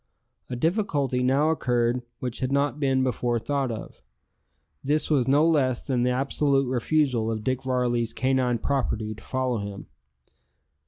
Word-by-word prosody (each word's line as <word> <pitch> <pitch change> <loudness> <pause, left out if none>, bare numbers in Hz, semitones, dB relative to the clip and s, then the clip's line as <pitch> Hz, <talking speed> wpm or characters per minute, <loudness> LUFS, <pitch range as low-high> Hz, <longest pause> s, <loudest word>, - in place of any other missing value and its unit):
A 125 - -3
difficulty 145 - 0
now 135 +5 +3
occurred 125 -4 +1 0.2
which 125 -2 -5
had 130 0 -2
not 140 +1 +1
before 130 -3 +1
been 115 - -7
thought 140 -3 0
of. 110 - -8 0.8
This 150 +3 +1
was 135 -4 +2
no 145 +4 +4
less 130 -6 +2
than 130 -3 0
the 125 - +2
absolute 135 +2 +1
refusal 125 -2 +1
of 110 -1 -3
Dick 130 +1 -1
Varley's 125 -3 0
canine 130 -2 +1
property 115 -4 -1
to 110 - -14
follow 130 -3 -1
him. 100 -1 -6
130 Hz, 150 wpm, -25 LUFS, 120-140 Hz, 0.8 s, no